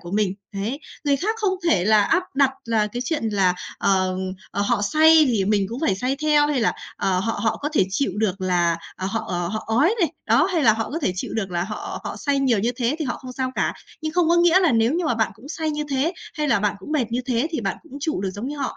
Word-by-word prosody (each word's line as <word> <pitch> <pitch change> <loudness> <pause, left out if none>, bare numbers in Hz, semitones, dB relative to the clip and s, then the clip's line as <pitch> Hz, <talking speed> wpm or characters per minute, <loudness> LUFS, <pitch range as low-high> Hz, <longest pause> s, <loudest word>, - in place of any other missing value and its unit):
của 175 - -9
mình. 205 -2 +1 0.2
Đấy. 220 +9 -3 0.2
Người 285 -1 +3
khác 425 +9 -1
không 410 -4 +1
thể 195 - +3
là 215 0 +5
áp 360 - +2
đặt 275 -1 +4
là 225 -2 +1
cái 240 +4 -4
chuyện 290 -4 -1
là, 195 -4 +2 0.2
ờm, 185 -1 +1 0.3
ờ, 200 - -1
họ 210 0 +1
say 315 +7 +6
thì 225 -7 +1
mình 200 -1 +2
cũng 235 +4 -6
phải 215 -12 +2
say 255 +7 -1
theo 300 -1 +4
hay 295 -3 0
là, 225 - +2 0.2
ờ, 185 -1 +1
họ 225 +3 -2
họ 225 - +1
có 295 - -3
thể 265 - +3
chịu 275 +9 0
được 205 -3 -1
là, 175 -2 +1 0.2
ờ, 190 - -3
họ, 225 - -2
ờ, 175 -1 -2
họ 215 +3 -4
ói 285 - +3
này, 335 -3 +2
đó, - - +4
hay 330 -4 +1
là 220 - +7
họ 225 +1 -3
có 310 - -2
thể 185 - 0
chịu - - -4
được 195 -4 -2
là 175 0 -1
họ 210 +2 -6
họ - - -5
say 285 -2 0
nhiều 255 -5 +2
như 225 +4 +1
thế 250 +3 0
thì 315 - -2
họ 250 - -2
không 255 -1 -9
sao 260 0 -2
cả. - - 0 0.3
Nhưng 310 0 -2
không 350 -2 +2
có 340 - +4
nghĩa 350 +1 +5
là 345 -7 +3
nếu 225 +2 +3
như 350 +1 0
mà 305 - +1
bạn 225 -2 +1
cũng 230 +7 -14
say 315 0 -2
như 300 0 -2
thế 275 +6 +1 0.2
hay 300 -1 -1
là 230 -7 +3
bạn 210 0 0
cũng 245 +10 -8
mệt 295 -5 +2
như 245 - 0
thế 250 +2 +1
thì 315 - -2
bạn 195 -3 -2
cũng 325 - -19
trụ 305 - -1
được 190 -1 -2
giống 205 +7 -5
như 295 - -5
họ. 275 - -3
240 Hz, 280 wpm, -23 LUFS, 200-300 Hz, 0.3 s, là